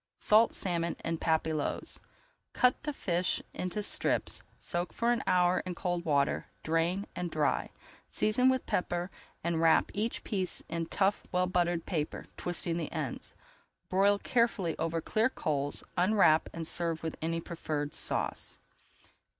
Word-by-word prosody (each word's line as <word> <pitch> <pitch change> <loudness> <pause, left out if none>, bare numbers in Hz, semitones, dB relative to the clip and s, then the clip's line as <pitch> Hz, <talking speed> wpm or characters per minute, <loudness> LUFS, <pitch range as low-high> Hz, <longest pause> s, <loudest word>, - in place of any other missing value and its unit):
SALT 220 +2 +4
SALMON 170 -2 0
IN 165 -1 -1
PAPILLOTES 160 -2 -1 0.5
Cut 250 0 +3
the 300 - -2
fish 180 -9 0
into 185 +3 -3
strips, - - +1 0.2
soak 175 -1 -3
for 235 +1 +1
an 240 - +1
hour 180 0 +4
in 185 -1 -5
cold 175 0 -2
water, 140 -3 +1 0.2
drain, 165 +5 +1
and 175 -1 -2
dry. 155 -2 0 0.4
Season 250 +5 +3
with 260 -1 +1
pepper 175 +1 -1 0.3
and 165 -1 0
wrap 165 -1 +4
each 215 +3 -2
piece 190 -4 0
in 165 -1 -3
tough, 200 +3 +1
well 180 0 +2
buttered 175 -2 0
paper, 155 -5 -3
twisting 170 -1 -1
the 170 - -3
ends. - - -4 0.5
Broil 200 +2 +4
carefully 200 -8 +1
over 165 0 -1
clear 220 +7 +2
coals, 145 - -2
unwrap 180 -4 +4
and 165 -1 -5
serve 165 -1 0
with 160 - -3
any 165 +1 -1
preferred 155 -3 -4
sauce. - - -1
175 Hz, 140 wpm, -31 LUFS, 165-195 Hz, 0.5 s, SALT